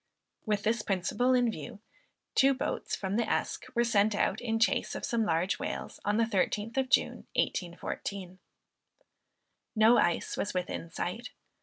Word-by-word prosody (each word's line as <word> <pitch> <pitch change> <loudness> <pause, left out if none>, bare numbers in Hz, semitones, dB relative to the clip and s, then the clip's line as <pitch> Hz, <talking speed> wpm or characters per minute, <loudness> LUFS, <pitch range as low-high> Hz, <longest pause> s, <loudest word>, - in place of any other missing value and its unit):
With 210 -1 0
this 225 +1 +1
principle 215 +7 +1
in 245 -2 +3
view, 220 -1 -8 0.5
two 270 0 +5
boats 255 - -2
from 195 +1 -2
the 235 -2 0
Esk - - -1
were 235 - +4
sent 215 -2 +3
out - - 0
in 225 -2 0
chase 230 - +1
of - - -3
some 230 -2 +1
large 165 +4 +1
whales, - - -5
on 205 +1 +1
the 230 - +4
13th 215 +1 0
of 265 -1 0
June - - +1
1814. 185 +1 -3 1.4
No 220 +2 +6
ice 175 -1 +1
was 200 - -3
within 180 -2 -3
sight. 225 +9 -4
215 Hz, 155 wpm, -30 LUFS, 190-235 Hz, 1.4 s, No